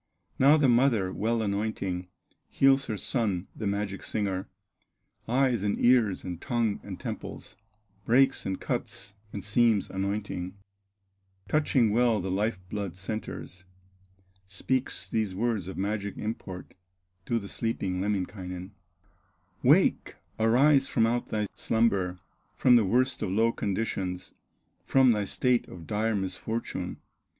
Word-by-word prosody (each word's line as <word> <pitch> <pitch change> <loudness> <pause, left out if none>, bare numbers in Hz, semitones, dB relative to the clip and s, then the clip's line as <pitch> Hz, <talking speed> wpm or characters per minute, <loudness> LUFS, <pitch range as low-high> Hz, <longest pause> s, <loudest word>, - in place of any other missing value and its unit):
Now 140 +4 +7
the 145 -3 +4
mother 120 -6 +3
well 115 +1 0
anointing, 100 -3 -2 0.4
Heals 135 0 +4
her 110 -2 -3
son, 100 -4 0
the 110 - -3
magic 100 -1 -2
singer, 95 -3 -2 0.8
Eyes, 125 -2 +2
and 100 0 0
ears, 120 -6 +3
and 90 -2 -6
tongue, 115 -4 0
and - - -8
temples, - - -6 0.5
Breaks, 135 +3 +4
and 95 -1 -3
cuts, - - -4 0.2
and 100 - -6
seams, 110 0 +2
anointing, 95 -1 -3 0.9
Touching 135 -7 +2
well 115 -1 +3
the 95 0 -3
life 105 +1 0
blood 100 -3 -4
centres, 90 -2 -6 0.8
Speaks 125 +7 -2
these 110 -4 -1
words 110 -3 -1
of 95 - -6
magic 100 +1 -2
import 95 -4 -6 0.5
To 120 - +1
the 100 -3 -5
sleeping 95 -5 -2
Lemminkainen: 95 -2 -3 0.9
"Wake, - - +3 0.2
arise 135 +5 +4
from 115 - +2
out 120 +1 0
thy 105 -1 -1
slumber, 100 -6 +1 0.4
From 125 -1 +5
the 115 -3 +5
worst 130 +6 +1
of - - -1
low 110 +4 +3
conditions, 95 -4 -3 0.5
From 130 -2 +5
thy 105 -2 0
state 125 +3 +1
of 85 -2 -10
dire 110 +3 0
misfortune!" 100 +4 -3
105 Hz, 125 wpm, -28 LUFS, 95-120 Hz, 0.9 s, Now